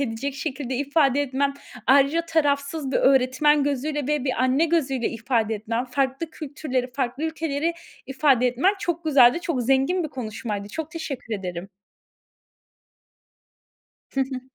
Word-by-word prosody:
edecek 270 Hz, +2 st, -3 dB
şekilde 270 Hz, -2 st, -4 dB
ifade 285 Hz, 0 st, +2 dB
etmen, 275 Hz, +1 st, -1 dB, 0.3 s
ayrıca 280 Hz, +5 st, +4 dB
tarafsız 285 Hz, -2 st, 0 dB
bir -, -, +3 dB
öğretmen 270 Hz, +3 st, +4 dB
gözüyle 290 Hz, 0 st, -2 dB
ve 295 Hz, -3 st, 0 dB
bir 260 Hz, -, +1 dB
anne 260 Hz, +5 st, +3 dB
gözüyle 270 Hz, -7 st, 0 dB
ifade 225 Hz, -1 st, -1 dB
etmen; 230 Hz, +4 st, -2 dB
farklı 270 Hz, +5 st, -2 dB
kültürleri, 270 Hz, -5 st, -4 dB
farklı 265 Hz, +2 st, -2 dB
ülkeleri 320 Hz, 0 st, -1 dB, 0.3 s
ifade 265 Hz, -2 st, +3 dB
etmen 275 Hz, +12 st, +2 dB
çok 340 Hz, -3 st, -3 dB
güzeldi. 275 Hz, 0 st, +5 dB
Çok 305 Hz, -8 st, -2 dB
zengin 270 Hz, +8 st, +2 dB
bir -, -, -3 dB
konuşmaydı. 215 Hz, -5 st, -5 dB
Çok 320 Hz, +6 st, -5 dB
teşekkür 275 Hz, -9 st, -5 dB
ederim. 180 Hz, -1 st, -5 dB, 2.4 s
Hı 270 Hz, -, -1 dB
hı. 260 Hz, -1 st, -2 dB
270 Hz, 130 wpm, -24 LUFS, 250-300 Hz, 2.4 s, güzeldi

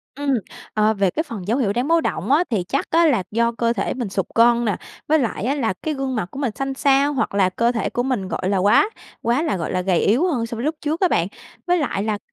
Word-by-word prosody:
Ừm, 280 Hz, -1 st, 0 dB, 0.4 s
ờ, 215 Hz, 0 st, +3 dB
về 195 Hz, -3 st, +1 dB
cái 315 Hz, -, -2 dB
phần 210 Hz, -, -8 dB
dấu 235 Hz, +5 st, +1 dB
hiệu 205 Hz, -7 st, +1 dB
đáng 245 Hz, +5 st, -1 dB
báo 330 Hz, 0 st, +3 dB
động 270 Hz, -, -2 dB
á, 305 Hz, +5 st, +5 dB
thì 210 Hz, -6 st, 0 dB
chắc 275 Hz, -, -1 dB
á 335 Hz, +1 st, +4 dB
là 245 Hz, -, +2 dB
do 235 Hz, +2 st, +2 dB
cơ 235 Hz, 0 st, 0 dB
thể 195 Hz, -, -2 dB
mình 240 Hz, -6 st, -4 dB
sụt 195 Hz, -1 st, -1 dB
cân 235 Hz, +1 st, +4 dB
nè, 210 Hz, -4 st, +1 dB, 0.3 s
với 310 Hz, +1 st, +4 dB
lại 230 Hz, -6 st, -2 dB
á 265 Hz, +5 st, 0 dB
là 230 Hz, -9 st, 0 dB
cái 315 Hz, -, -1 dB
gương 270 Hz, -2 st, -3 dB
mặt 215 Hz, -6 st, -2 dB
của 270 Hz, -, -7 dB
mình 265 Hz, -5 st, 0 dB
xanh 270 Hz, 0 st, -2 dB
xao 280 Hz, +1 st, +3 dB
hoặc 265 Hz, -, -1 dB
là 190 Hz, -2 st, +3 dB
cơ 235 Hz, +5 st, +1 dB
thể 230 Hz, -, -2 dB
của 245 Hz, -, -1 dB
mình, 250 Hz, -8 st, -1 dB
gọi 185 Hz, 0 st, -2 dB
là, 200 Hz, -, +1 dB
quá 205 Hz, -, +4 dB, 0.3 s
quá 240 Hz, +6 st, +1 dB
là 300 Hz, -, 0 dB
gọi 165 Hz, -, -3 dB
là 185 Hz, -, 0 dB
gầy 180 Hz, -2 st, +1 dB
yếu 255 Hz, -, +3 dB
hơn 250 Hz, -10 st, 0 dB
so 230 Hz, -, -6 dB
với 235 Hz, -, -4 dB
lúc 310 Hz, +2 st, 0 dB
trước 310 Hz, +2 st, -1 dB
á 370 Hz, -, +5 dB
bạn. 170 Hz, -, +1 dB, 0.4 s
Với 355 Hz, 0 st, +3 dB
lại 285 Hz, -, -1 dB
là 215 Hz, -1 st, -1 dB
240 Hz, 280 wpm, -21 LUFS, 205-280 Hz, 0.4 s, á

